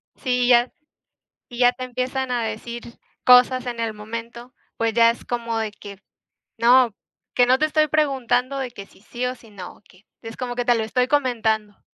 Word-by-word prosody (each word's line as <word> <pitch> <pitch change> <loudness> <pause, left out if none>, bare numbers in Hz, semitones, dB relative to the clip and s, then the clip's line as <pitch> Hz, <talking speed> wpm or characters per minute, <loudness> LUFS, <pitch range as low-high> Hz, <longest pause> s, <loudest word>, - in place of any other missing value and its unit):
Sí, 250 -2 -1
y - - +1
ya 240 0 +4 0.8
y 240 - -9
ya 245 0 +6
te 255 - -8
empiezan 255 +1 -3
a 240 -2 0
decir 230 +2 -6 0.4
cosas 250 0 +6
en 240 -1 -5
el 225 -1 -2
momento. 230 +3 -8 0.2
Pues 230 -1 0
ya 230 0 +5
es 235 - -4
como 235 -1 -3
de 220 -2 -2
que 200 -1 -12 0.6
no, 240 -1 +5 0.4
que 245 - +4
no 255 +1 +4
te 310 - +2
estoy 310 0 +2
preguntando 270 -3 0
de 260 -2 -3
que 200 -4 -10
si - - -23
sí 240 +4 -5
o 250 - -3
si 225 - -18
no, 190 -3 -10
que 185 +2 -22 0.2
es 225 0 -9
como 245 -1 -5
que 245 - -1
te 240 0 +3
lo 225 - 0
estoy 250 +3 0
comentando. 220 -7 0
240 Hz, 200 wpm, -22 LUFS, 225-255 Hz, 0.8 s, ya